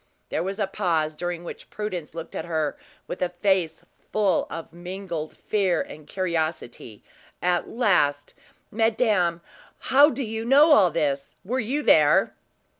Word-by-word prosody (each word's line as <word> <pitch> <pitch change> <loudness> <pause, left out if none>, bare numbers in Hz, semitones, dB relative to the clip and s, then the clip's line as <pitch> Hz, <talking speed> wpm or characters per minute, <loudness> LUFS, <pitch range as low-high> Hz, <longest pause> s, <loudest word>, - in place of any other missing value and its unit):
There - - -1
was 195 +3 -3
a 210 - +1
pause, 170 -6 -1
during 175 +2 -4
which - - -9
Prudence 180 -7 -5
looked 165 0 -7
at - - -4
her 160 -3 -1 0.3
with - - -7
a 180 - +1
face 180 -2 0 0.3
full 205 -3 +2
of 165 0 -7
mingled 175 -2 -6
fear 190 -5 0
and 150 -1 -7
curiosity. 160 - -3 0.4
At 180 -1 0
last: 160 - +1 0.4
"Madame, 215 -6 +1 0.4
how 285 +3 +5
do 270 -1 -3
you 225 -1 -4
know 285 +6 +6
all 205 -11 +6
this? 145 -4 -2
Were 250 +6 -1
you 265 +6 -1
there?" 150 - +4
180 Hz, 145 wpm, -25 LUFS, 160-215 Hz, 0.4 s, know